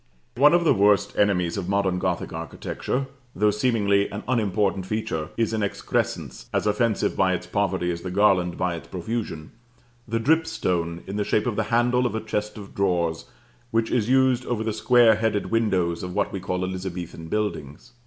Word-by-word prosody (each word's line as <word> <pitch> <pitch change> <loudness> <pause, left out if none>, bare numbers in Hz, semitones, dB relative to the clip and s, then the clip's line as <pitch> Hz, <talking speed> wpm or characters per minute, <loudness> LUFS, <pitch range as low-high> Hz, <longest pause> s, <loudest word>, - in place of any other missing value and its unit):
One 145 +6 +6
of 175 - +3
the 165 - +4
worst 100 0 +3
enemies 95 -3 +1
of 95 -2 -3
modern 100 -2 +1
Gothic - - -2
architecture, 135 +2 -3 0.3
though 105 0 +3
seemingly 105 -3 +2
an 105 +1 -6
unimportant 105 -5 0
feature, 90 -8 -2
is 115 -1 0
an 110 - 0
excrescence, 100 - -2
as - - 0
offensive 105 +1 +1
by 95 -1 +2
its - - -6
poverty 95 -3 0
as 85 0 -5
the 90 - -5
garland 90 -2 +2
by 90 -1 0
its 85 - -8
profusion, 90 -4 -4 0.6
the 115 +1 -1
dripstone 90 - 0
in 100 +2 -5
the 105 - +1
shape 105 +1 +1
of 120 -3 -1
the 110 0 0
handle 125 +1 +3
of 110 - -5
a - - 0
chest 105 -1 -3
of 100 -2 -10
drawers, 85 -4 0 0.4
which 115 -1 0
is 120 -2 +1
used 130 -1 +3
over 115 -3 -1
the 110 -1 -1
square 115 0 +5
headed 110 -2 -1
windows 95 -7 +1
of 90 0 -6
what - - 0
we 95 - -3
call 90 -1 -2
Elizabethan 90 -3 -6
buildings. 80 - -4
105 Hz, 185 wpm, -24 LUFS, 90-115 Hz, 0.6 s, One